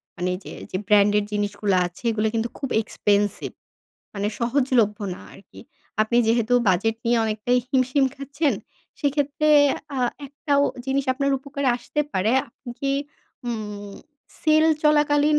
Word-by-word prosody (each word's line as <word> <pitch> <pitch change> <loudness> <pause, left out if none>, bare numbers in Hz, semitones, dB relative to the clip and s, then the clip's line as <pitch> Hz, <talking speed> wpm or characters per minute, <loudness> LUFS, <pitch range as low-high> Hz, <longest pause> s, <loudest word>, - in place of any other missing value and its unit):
মানে 180 0 -1
যে - - -9 0.2
যে - - -1
ব্র্যান্ডের 210 0 +4
জিনিসগুলা 205 -1 0
আছে 175 - -16
এগুলা 220 0 0
কিন্তু 230 +1 0
খুব 275 - -4
এক্সপেনসিভ 205 -1 0 0.6
মানে 200 0 -2
সহজলভ্য 235 -3 +2 0.2
না - - -12
আরকি। 195 - -15 0.4
আপনি 220 +2 0
যেহেতু 230 +1 +1 0.2
বাজেট 200 +5 +2
নিয়ে 235 0 +3
অনেকটাই 220 +3 +1
হিমশিম 260 +1 +2
খাচ্ছেন, 280 +2 -1 0.5
সেক্ষেত্রে 290 +1 0 0.5
আ - - -1 0.3
একটা 290 +1 -5 0.3
জিনিস 270 +1 0
আপনার 275 +2 0
উপকারে 280 0 -3
আসতে 275 +5 -3
পারে। 195 +5 +1 0.2
আপনি 240 +2 -11
কি 275 0 0 0.6
উম 210 -3 -5 0.5
সেল 310 0 +4 0.2
চলাকালীন 300 0 +4
240 Hz, 135 wpm, -23 LUFS, 210-280 Hz, 0.6 s, ব্র্যান্ডের